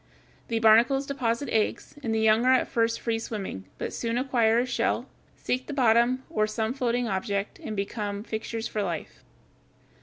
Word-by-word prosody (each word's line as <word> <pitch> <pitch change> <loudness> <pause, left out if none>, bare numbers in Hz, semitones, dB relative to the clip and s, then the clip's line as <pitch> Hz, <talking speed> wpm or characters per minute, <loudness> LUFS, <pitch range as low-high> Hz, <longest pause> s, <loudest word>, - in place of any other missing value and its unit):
The 230 - -1
barnacles 230 +5 +5
deposit 265 -1 -1
eggs, 220 -1 -1
and 230 - -2
the 220 - +1
young 220 +1 +4
are 260 +1 +5
at - - +1
first 230 -1 0
free 230 -1 -1
swimming, 195 - -5
but - - -4
soon 230 0 -2
acquire 240 -4 +2
a 245 - +2
shell, 250 - -1 0.3
seek 255 +1 -2
the 295 - -4
bottom, 245 0 +3
or 215 -1 0
some 220 +2 -2
floating 245 -2 0
object, 200 0 -2
and 215 - -5
become 205 0 -3
fixtures 225 +1 -4
for 215 - -2
life. 175 -5 -5
230 Hz, 175 wpm, -27 LUFS, 215-245 Hz, 0.3 s, barnacles